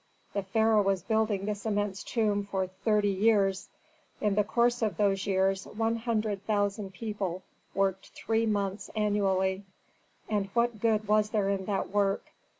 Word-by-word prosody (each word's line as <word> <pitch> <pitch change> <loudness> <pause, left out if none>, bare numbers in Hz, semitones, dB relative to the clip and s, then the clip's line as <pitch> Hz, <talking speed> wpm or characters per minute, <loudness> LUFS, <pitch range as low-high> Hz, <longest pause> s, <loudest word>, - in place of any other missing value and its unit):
The 200 - 0
pharaoh 220 +2 +3
was 195 -3 0
building 220 -2 0
his 210 -1 -3
immense 205 -2 -1
tomb 210 -3 0
for 195 -1 -2
thirty 205 +2 +1
years; 195 -1 +2 0.5
in 210 -2 +1
the 210 +1 +3
course 240 +3 +1
of 210 -7 0
those 195 -1 +1
years 195 0 +1
one 225 +1 -1
hundred 215 -4 -1
thousand 205 -2 0
people 195 -4 -4 0.3
worked 195 -1 0
three 225 +1 -1
months 200 -1 -1
annually. 195 -2 +1 0.6
And 205 -2 0
what 235 -2 +1
good 215 -1 +1
was 210 0 +3
there 210 -3 +1
in 195 -1 -1
that 195 -1 -1
work? 200 -1 0
205 Hz, 150 wpm, -29 LUFS, 195-215 Hz, 0.6 s, pharaoh